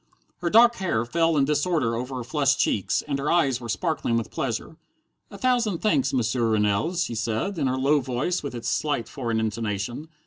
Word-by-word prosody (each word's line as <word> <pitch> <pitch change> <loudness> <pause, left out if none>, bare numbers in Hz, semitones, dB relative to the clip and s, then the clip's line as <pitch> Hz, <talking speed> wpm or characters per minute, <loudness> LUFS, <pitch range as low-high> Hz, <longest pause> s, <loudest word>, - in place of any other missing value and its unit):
Her 175 - -1
dark 235 +4 +6
hair 120 -12 -1
fell 165 +4 +1
in 140 - +4
disorder 145 -4 +1
over 125 +3 -4
her 125 - -4
flushed 140 +2 +1
cheeks, 100 - +1
and 140 -2 -1
her 140 - -1
eyes 135 -8 +2
were 120 - -7
sparkling 120 - -1
with 115 -4 -3
pleasure. - - -3 0.5
"A 200 - -10
thousand 235 -4 +1
thanks, 145 -9 +1
M'sieur 120 -2 +1
Rennell," 105 - +1
she 170 -8 -1
said, 115 - -2
in 140 - +1
her 130 0 0
low 140 +3 +3
voice 130 +7 -2
with 140 -3 -6
its 120 - -5
slight 145 -6 -1
foreign 115 -5 -2
intonation. 110 +5 -3
135 Hz, 195 wpm, -25 LUFS, 115-165 Hz, 0.5 s, dark